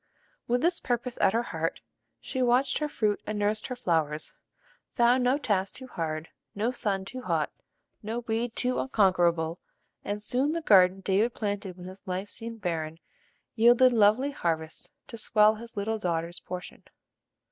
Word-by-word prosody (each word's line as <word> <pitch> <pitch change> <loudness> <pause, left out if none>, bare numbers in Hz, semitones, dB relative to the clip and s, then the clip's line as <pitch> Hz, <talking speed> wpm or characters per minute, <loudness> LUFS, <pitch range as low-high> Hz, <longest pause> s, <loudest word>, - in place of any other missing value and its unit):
With 245 +1 +1
this 345 +2 +2
purpose 245 0 -2
at 190 - +4
her 230 +1 +1
heart, - - -3 0.4
she 260 - -4
watched 250 +2 +3
her 300 -1 -1
fruit 210 -7 0
and 215 - -2
nursed 210 +1 0
her 255 - -4
flowers; 160 -9 -1 0.6
found 245 +1 +4
no 255 +3 +3
task 200 -8 -1
too 260 - -7
hard, 160 -8 -4 0.3
no 220 +4 0
sun 200 -6 -2
too 255 +6 -7
hot, - - -1 0.5
no 225 +3 -3
weed 230 0 -2
too 250 0 0
unconquerable; 175 -7 +2 0.4
and 205 +1 -4
soon 265 +7 +1
the 335 - -2
garden 190 -5 +5
David 200 +5 +1
planted 200 -3 -3
when 180 - -10
his 190 +1 -11
life 185 +2 -3
seemed 230 -1 -7
barren, 160 -3 -2 0.6
yielded 240 +2 +6
lovely 225 +6 +4
harvests 160 - -3 0.2
to 230 - -9
swell 215 0 +4
his 230 0 -11
little 220 +2 -1
daughter's 170 -2 -2
portion. 180 +1 -8
215 Hz, 160 wpm, -28 LUFS, 185-245 Hz, 0.6 s, yielded